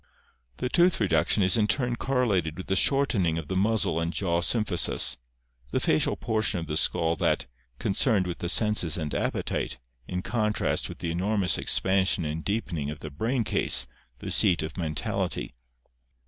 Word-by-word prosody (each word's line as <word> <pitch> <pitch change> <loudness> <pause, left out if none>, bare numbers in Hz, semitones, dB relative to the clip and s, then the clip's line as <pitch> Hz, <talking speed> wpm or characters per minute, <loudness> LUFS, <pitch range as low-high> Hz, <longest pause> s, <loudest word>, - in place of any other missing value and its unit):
The - - -2
tooth 175 +6 +3
reduction 95 0 +2
is 95 +5 +3
in 105 -1 +2
turn 120 0 0
correlated 105 -12 0
with 95 - -6
the 95 - 0
shortening 100 - +2
of 80 -3 -6
the 95 - -2
muzzle 100 -4 +1
and 85 0 -1
jaw 85 -2 0
symphysis 100 -2 +1 0.2
— - - -34
the - - +1
facial - - +1
portion 110 -4 0
of 80 - -5
the 75 - -3
skull, 80 +1 +2
that - - +1 0.3
concerned 100 - +2
with 90 -1 -5
the 85 - -2
senses 105 -6 +2
and 75 -3 -3
appetite, - - -2 0.3
in 90 0 -3
contrast 105 -1 -1
with - - -8
the 85 - -3
enor 100 +5 -1
mous 95 -3 +2
expansion 95 -2 +1
and 80 +2 -3
deepening 90 -9 -2
of 75 - -5
the 75 0 -8
brain 115 - -1
case, - - +3 0.3
the - - -6
seat 85 -3 +3
of 80 -1 -6
mental 80 -4 -2
ity. - - -5
95 Hz, 175 wpm, -27 LUFS, 80-110 Hz, 0.3 s, tooth